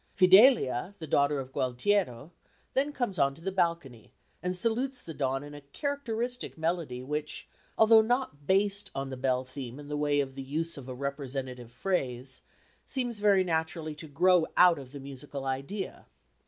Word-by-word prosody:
Fidelia, 190 - +6
the 160 - -7
daughter 140 -1 +2
of 130 -1 -6
Gualtiero, 130 - 0 0.4
then 280 +3 +1
comes 245 -9 -2
on 140 0 +3
to 165 - -15
the 195 - -1
balcony 170 - -1 0.3
and 180 0 -2
salutes 250 +6 0
the 165 - -9
dawn 135 -1 -1
in 145 0 -10
a 145 - -9
characteristic 245 - -4
melody 160 -6 -2
which, 150 +3 -4 0.3
although 220 0 +7
not 220 - -1
based 200 +1 +2
on 135 0 -3
the - - -4
bell 130 0 0
theme 130 -1 -7
in 145 0 -10
the 150 - -2
way 145 -1 +1
of 135 -1 -1
the 135 - -6
use 160 +5 -2
of 135 -2 -9
a 130 - -5
representative 130 -3 -5
phrase, 130 -5 -2 0.5
seems 245 -5 -2
very 200 -2 +4
naturally 160 -2 -1
to 155 +1 -10
grow 175 +3 +4
out 180 -3 +7
of 130 -2 -11
the 140 - -8
musical 140 0 -7
idea. 140 +10 -4
150 Hz, 170 wpm, -29 LUFS, 135-195 Hz, 0.5 s, although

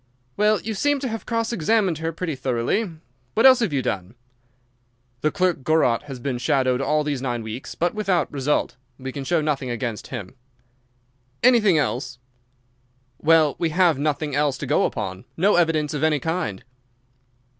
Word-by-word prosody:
"Well, 210 0 +3
you 220 - -4
seem 290 +7 +1
to 270 - -2
have 225 0 -6
cross 230 0 -1
examined 190 -3 +1
her 165 0 -2
pretty 165 0 -4
thoroughly. 130 - -1 0.5
What 225 - +4
else 260 -1 +8
have 225 -8 0
you 135 -3 0
done?" 95 +1 -3 1.1
"The 155 - +2
clerk 180 -3 0
Gorot 145 -5 +2
has 135 -3 -7
been 125 0 -3
shadowed 130 0 +1
all 150 +2 +1
these 145 -3 -2
nine 120 -3 -2
weeks, 110 +4 -7
but 175 +1 0
without 190 -7 0
result. 140 0 0 0.2
We 130 0 -6
can 140 +1 -6
show 165 +4 +1
nothing 145 -4 -1
against 120 -2 -4
him." 110 -6 -7 1.1
"Anything 225 -8 +5
else?" 130 -3 -2 1.0
"Well, 155 -2 +4
we 165 - +1
have 170 -3 +3
nothing 150 0 -1
else 145 -1 +1
to - - -5
go - - +2
upon—no 125 - -1
evidence 160 -4 +2
of 150 - -2
any 155 -2 +3
kind." 150 - -3
150 Hz, 165 wpm, -23 LUFS, 130-180 Hz, 1.1 s, else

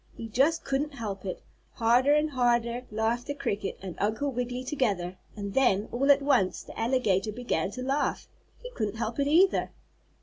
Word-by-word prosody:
He 230 - -6
just 280 +9 +2
couldn't 275 +2 -1
help 205 -6 -5
it. 185 - -5 0.3
Harder 245 +5 +4
and 300 0 +1
harder 240 -1 +1
laughed 220 +3 -1
the 285 - -3
cricket 205 -7 -3
and 185 -2 -5
Uncle 220 +8 0
Wiggily 250 0 -3
together, 200 - -1 0.2
and 200 -2 -5
then, 225 -6 +2
all 275 +4 +3
at 280 0 +4
once, 205 -10 +2
the - - -10
alligator 225 -4 +1
began 215 -7 -1
to 255 +5 -6
laugh. 275 +3 -1 0.3
He - - -10
couldn't 215 - -3
help 225 +2 -3
it 280 - +2
either. 355 +6 +4
240 Hz, 175 wpm, -28 LUFS, 210-275 Hz, 0.3 s, Harder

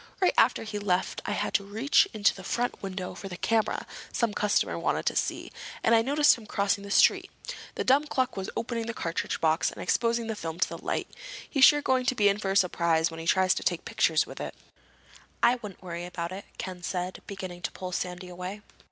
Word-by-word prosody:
"Right 370 - +3
after - - +4
he 215 -2 -4
left 190 -2 0
I 205 - 0
had - - -2
to 200 - +2
reach 220 +8 +3
into 205 -2 +3
the 190 - -11
front 240 +5 -2
window 185 -2 -5
for 195 - -8
a 175 -2 -7
camera 225 +2 0 0.3
some 235 -3 0
customer 210 0 +1
wanted - - 0
to - - +1
see, - - -2 0.3
and 225 - +4
I 225 - +6
noticed 285 +1 +4
him 215 - -13
crossing 200 +1 0
the 200 - -8
street. - - +4 0.5
The - - -1
dumb 275 +3 +4
cluck 260 -3 0
was 190 -1 -4
opening 230 -1 -2
the 235 - -4
cartridge 165 0 -2
box 160 0 +2
and - - -11
exposing 235 0 +1
the 220 -1 -3
film 165 -3 -5
to - - +3
the - - -8
light! - - -1 0.4
He's 275 -3 +6
sure 295 -1 +5
going 255 -1 +1
to 255 - +2
be 205 -3 +4
in 200 +1 0
for 195 - -2
a 195 - +2
surprise 170 -3 +2
when 165 - -8
he 165 - -6
tries 185 +1 +4
to - - -4
take - - -1
pictures - - +2
with - - -9
it." - - -5 0.9
"I 245 - +5
wouldn't 210 -5 -10
worry 175 -1 -5
about 170 -1 -4
it," 195 +2 -7
Ken 185 -1 -6
said, 180 +1 -3
beginning 185 -3 -7
to - - -3
pull 185 -1 -6
Sandy 180 0 -4
away. 180 +3 -7
200 Hz, 225 wpm, -28 LUFS, 180-230 Hz, 0.9 s, I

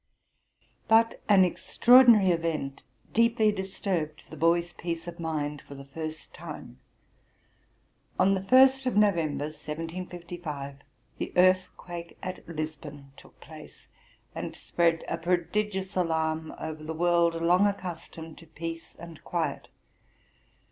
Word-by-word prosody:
But 225 +1 +4
an 195 -2 +7
extraordinary 235 +1 +6
event 165 -5 -2 0.3
deeply 230 -1 +4
disturbed 190 -5 -4
the - - -7
boy's 170 +1 +2
peace 170 -1 -5
of 170 0 -8
mind 150 -3 -3
for 140 - -12
the 140 0 -10
first 155 +2 -7
time. 60 - -9 1.4
On 195 +1 +4
the 190 - 0
Ist 260 +5 +5
of 245 - 0
November, 165 -9 +2
1755, 165 -2 -6 0.4
the - - -3
earthquake 180 -2 +1
at 185 -1 -6
Lisbon 155 -3 -6
took - - -18
place, - - -13 0.4
and - - -5
spread 170 -1 +1
a 165 - -3
prodigious 190 +3 -1
alarm 160 -2 0
over 155 -1 -6
the 160 +1 -5
world, 170 0 +3
long 180 +4 +4
accustomed 170 -4 -6
to 165 - -15
peace 165 +1 -7
and 170 -1 -12
quiet. 160 -5 -2
170 Hz, 120 wpm, -28 LUFS, 155-190 Hz, 1.4 s, an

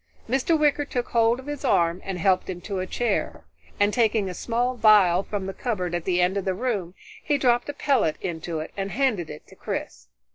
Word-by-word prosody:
Mr. 270 +7 +2
Wicker 295 -1 +3
took 250 -3 -3
hold 230 +1 +3
of 260 - -10
his 290 -1 -5
arm 170 -8 +2
and 195 -2 -4
helped 185 +1 +1
him 180 -1 -4
to 195 +1 -4
a 185 - -3
chair, 240 - -2 0.3
and 205 0 +3
taking 220 -4 +2
a 185 - -4
small 240 +6 -1
vial 205 -6 +5
from 200 -1 -4
the 195 - -4
cupboard 185 -8 -3
at 175 -1 -2
the 180 -2 +1
end 180 +2 +2
of 195 - -2
the 190 -1 0
room, 200 -6 -2 0.3
he 290 - +1
dropped 245 -1 +2
a - - -3
pellet 275 - +1
into 165 -2 -4
it 155 - -8
and 195 0 -3
handed 215 - 0
it 150 - -9
to - - -17
Chris. - - -5
205 Hz, 220 wpm, -25 LUFS, 180-245 Hz, 0.3 s, vial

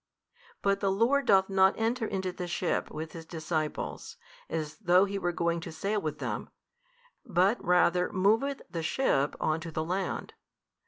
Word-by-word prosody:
But 200 0 +2
the 200 - +1
Lord 240 +7 +2
doth 190 -1 +5
not 190 0 +4
enter 225 +1 0
into 190 -2 -2
the 180 0 -5
ship 175 +1 -1
with 160 +1 -6
His 165 - -8
disciples, 160 -1 -4 0.3
as 155 -2 -3
though 185 -2 +4
He 200 0 -3
were 175 -2 0
going 170 0 0
to 165 - -7
sail 200 +6 -1
with 155 -1 -3
them, - - -4 0.7
but 200 0 +2
rather 180 0 +3
moveth 225 +9 +1
the 165 - -4
ship 155 - +1
on 155 +1 +1
to 165 - -7
the 155 0 -2
land. 185 +3 -3
185 Hz, 165 wpm, -29 LUFS, 165-200 Hz, 0.7 s, doth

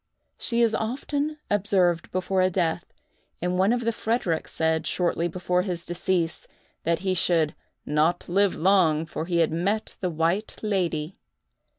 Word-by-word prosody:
She 235 -1 +1
is 225 -1 +3
often 285 +6 -2
observed 185 -4 +2
before 185 +1 0
a 185 - +4
death; 175 -1 -1 0.5
and 180 +1 -1
one 195 +3 +4
of 240 0 +1
the 230 0 +1
Fredericks 220 -7 -1
said, 160 0 0
shortly 175 -1 0
before 180 +1 0
his 180 -3 -3
decease, 175 -1 -1 0.4
that 170 0 +2
he 190 - +2
should 165 -4 +2 0.3
"not 155 +4 +1
live 195 +2 +2
long, 165 -4 +3
for 160 0 -5
he 170 -2 +2
had - - -8
met 195 +7 -1
the 185 - -1
White 170 +6 0
Lady." 180 -6 -1
180 Hz, 155 wpm, -25 LUFS, 165-200 Hz, 0.5 s, a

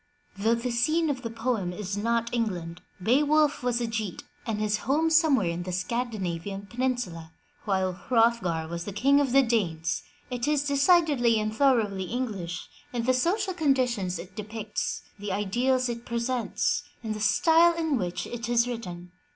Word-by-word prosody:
Though 220 +4 +2
the 240 +1 -3
scene 310 +7 +2
of 265 -3 -4
the 230 - -4
poem 225 -5 -1
is 195 +1 -4
not 230 +2 0
England, 180 -7 -2
— 180 - -17
Beowulf 295 +6 +3
was 245 -1 0
a 240 - -1
Geat 220 -5 -4 0.2
and 220 -2 -1
his 210 0 +1
home 320 +4 +3
somewhere 305 - +4
in 170 +1 -4
the 180 +1 -5
Scandinavian 195 -2 -3
peninsula, 235 -9 -3 0.3
while 190 -2 +1
Hrothgar 210 -6 +1
was 170 +1 -5
King 275 +7 +4
of 280 -3 +1
the 275 +1 +6
Danes 175 -9 0 0.2
— - - -32
it 245 +1 -2
is 295 -2 +2
decidedly 285 -5 +3
and 215 0 -2
thorougly 220 -8 +2
English 205 -9 -4 0.2
in 240 -2 -2
the 255 +2 +3
social 375 - +1
conditions 250 - +1
it 185 +1 -10
depicts, 215 0 -4 0.2
the 205 0 -4
ideals 245 +7 +1
it 235 -1 -4
presents, 235 +1 -1 0.2
and 220 -1 -2
the 215 - -6
style 325 +11 +4
in 320 -3 0
which 180 -6 -2
it 235 -1 -5
is 240 0 +3
written. 180 -7 -6
230 Hz, 165 wpm, -27 LUFS, 195-255 Hz, 0.3 s, the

